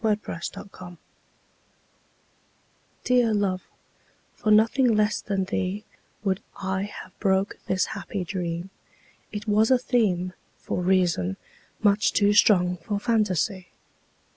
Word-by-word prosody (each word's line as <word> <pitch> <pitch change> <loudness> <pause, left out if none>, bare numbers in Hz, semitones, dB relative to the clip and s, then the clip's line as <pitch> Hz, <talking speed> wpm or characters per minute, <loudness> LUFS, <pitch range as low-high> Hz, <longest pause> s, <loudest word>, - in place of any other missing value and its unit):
The 215 -1 +3 0.6
Dream 175 -1 -11 2.1
DEAR 245 -3 +3
love, 190 -3 0 0.7
for 215 - -2
nothing 225 +3 +4
less 215 +1 +1
than 195 -2 -1
theeWould 190 0 -4 0.2
I 190 +1 -2
have 185 - -19
broke 195 -1 +1
this 185 -1 +1
happy 200 -3 -4
dream; 175 0 -4 0.6
It 210 +1 -6
was 215 +1 +3
a 260 - +6
themeFor 195 -8 0 0.5
reason, 175 - +1 0.5
much 205 0 +3
too 205 0 +4
strong 180 -4 +4
for 200 +5 -3
fantasy. 200 -4 0
200 Hz, 105 wpm, -25 LUFS, 185-215 Hz, 2.1 s, a